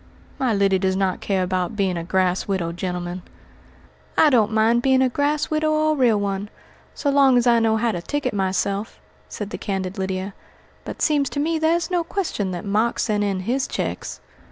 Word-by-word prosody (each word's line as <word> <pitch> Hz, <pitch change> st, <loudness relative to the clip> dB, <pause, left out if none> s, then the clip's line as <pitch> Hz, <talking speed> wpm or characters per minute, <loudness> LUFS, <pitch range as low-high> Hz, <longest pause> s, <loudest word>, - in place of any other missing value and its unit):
"My 260 Hz, -3 st, +1 dB
Lyddy 195 Hz, -2 st, +2 dB
does 190 Hz, 0 st, 0 dB
not 190 Hz, -1 st, -1 dB
care 190 Hz, -2 st, 0 dB
about 185 Hz, +1 st, -2 dB
being 195 Hz, -3 st, 0 dB
a 170 Hz, -, -3 dB
grass 185 Hz, +1 st, 0 dB
widow, 185 Hz, -4 st, -1 dB
gentlemen." 180 Hz, 0 st, -4 dB, 1.0 s
"I 305 Hz, -, +6 dB
don't 225 Hz, -4 st, +3 dB
mind 225 Hz, +2 st, +3 dB
being 265 Hz, 0 st, +3 dB
a 260 Hz, -, +2 dB
grass 290 Hz, +4 st, 0 dB
widow 310 Hz, 0 st, +1 dB
or 310 Hz, 0 st, +2 dB
a -, -, +1 dB
real 240 Hz, -6 st, +3 dB
one, 200 Hz, 0 st, -3 dB, 0.5 s
so 285 Hz, -, 0 dB
long 275 Hz, -2 st, +5 dB
as 240 Hz, -, +2 dB
I 235 Hz, -1 st, +5 dB
know 225 Hz, -1 st, +2 dB
how 230 Hz, +1 st, +1 dB
to 175 Hz, -4 st, -4 dB
ticket 290 Hz, +4 st, -2 dB
myself," 195 Hz, +2 st, -1 dB, 0.3 s
said 210 Hz, -1 st, -6 dB
the -, -, -5 dB
candid 190 Hz, 0 st, -3 dB
Lydia; 190 Hz, +1 st, -3 dB, 0.5 s
"but -, -, -5 dB
seems 290 Hz, -3 st, +2 dB
to 285 Hz, -, -4 dB
me 320 Hz, +2 st, 0 dB
there's 335 Hz, +3 st, +1 dB
no 350 Hz, -1 st, +1 dB
question 330 Hz, -, -2 dB
that 180 Hz, 0 st, -5 dB
Mark's 215 Hz, +4 st, +1 dB
sent 210 Hz, -2 st, 0 dB
in 195 Hz, -2 st, -1 dB
his 255 Hz, +7 st, -1 dB
checks." -, -, -4 dB
210 Hz, 200 wpm, -22 LUFS, 190-270 Hz, 1.0 s, I